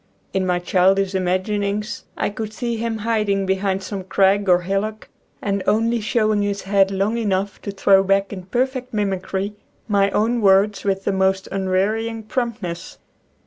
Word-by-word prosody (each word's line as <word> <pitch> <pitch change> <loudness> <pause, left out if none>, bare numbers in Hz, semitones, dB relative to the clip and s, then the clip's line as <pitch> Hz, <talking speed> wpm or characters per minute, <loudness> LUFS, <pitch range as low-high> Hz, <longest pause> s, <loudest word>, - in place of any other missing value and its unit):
In 190 -1 0
my 180 -1 +2
child 185 +2 +3
ish 195 0 0
imaginings 200 +3 -1
I - - -1
could 215 +1 -5
see 235 +1 -2
him 225 0 -2
hiding 210 -4 +1
behind 190 0 0
some 195 0 -5
crag 195 +1 +2
or 180 0 +5
hillock 195 +4 -3 0.3
and 200 -1 0
only 225 +2 +2
showing 215 -1 +1
his 200 -1 -2
head 195 0 +3
long 200 +4 0
enough 195 -2 -1
to - - -6
throw 195 0 +4
back 195 +1 +1
in 185 -2 -8
perfect 255 +1 -2
mimicry 195 0 -2 0.3
my 200 -2 +3
own 230 +4 +1
words 195 0 +4
with 195 -1 0
the 200 - 0
most 190 0 +1
un 195 -1 -2
wearying 220 +4 0
promptness. 215 -8 -4
200 Hz, 165 wpm, -21 LUFS, 190-215 Hz, 0.3 s, or